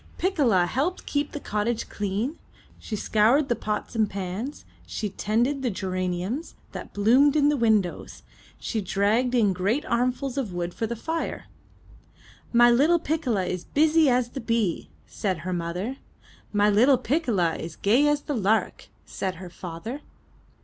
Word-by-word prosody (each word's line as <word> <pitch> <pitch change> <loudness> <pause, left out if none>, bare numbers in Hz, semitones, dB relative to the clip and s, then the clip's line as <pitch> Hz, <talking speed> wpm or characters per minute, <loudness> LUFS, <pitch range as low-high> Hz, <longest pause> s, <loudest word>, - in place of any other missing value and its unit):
Piccola 270 - +2
helped 285 - -2
keep 290 0 -1
the 295 - -5
cottage 220 -1 -2
clean; 210 +9 -3 0.4
she 220 - -5
scoured 225 +8 +3
the 240 - +2
pots 210 +2 -4
and 215 -2 +2
pans; 200 +8 -5 0.2
she 210 - -3
tended 240 +8 0
the 255 - 0
geraniums 185 - -3 0.2
that - - -8
bloomed 255 +8 +4
in 290 -1 +4
the 295 - +2
windows; 220 -8 0 0.3
she 220 - -3
dragged 210 +7 +1
in 210 -5 +3
great 200 +11 0
armfuls 255 +3 0
of 220 -9 -3
wood 175 0 -3
for 225 - -2
the 235 - -3
fire. 325 +8 -4 1.1
''My 240 0 +6
little 310 +7 +4
Piccola 290 - -1
is 180 -1 -3
busy 310 0 +3
as 245 -1 +2
the 270 - -6
bee/' 230 -6 -1 0.2
vsaid 190 -7 -3
her 185 +1 -3
mother. 180 +9 -3 0.5
''My 205 0 +3
little 250 +6 +5
Piccola 230 - 0
is 165 0 -7
gay 245 +9 +3
as 295 0 +2
the 295 - -3
lark," 215 0 0 0.2
said 190 -1 -4
her 180 0 -9
father. 180 - -7
225 Hz, 155 wpm, -25 LUFS, 195-275 Hz, 1.1 s, My